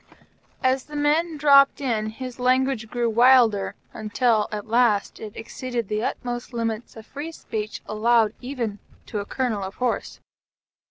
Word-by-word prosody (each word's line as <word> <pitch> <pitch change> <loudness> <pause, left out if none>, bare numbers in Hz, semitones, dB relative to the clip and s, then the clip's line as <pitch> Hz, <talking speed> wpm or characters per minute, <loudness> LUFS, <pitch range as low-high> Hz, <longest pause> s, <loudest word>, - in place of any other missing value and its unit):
As 260 0 +2
the 300 - -10
men 305 +3 +1
dropped 280 -1 +6
in, 230 -6 -1
his 250 +2 -8
language 255 -2 +1
grew 240 0 0
wilder, 230 -3 +4 0.2
until 220 0 +1
at 210 -1 -4
last 230 -3 +2
it 215 -2 -8
exceeded 235 -1 -4
the 215 +1 -1
utmost 240 0 -4
limits 230 -1 -3
of 220 -1 -11
free 295 +6 -6
speech 215 -8 -5
allowed 220 0 +2
even 240 -6 -4 0.3
to 210 - -4
a 200 - -4
Colonel 235 -3 -2
of 190 0 -6
Horse. 250 -1 -2
240 Hz, 150 wpm, -24 LUFS, 215-260 Hz, 0.3 s, dropped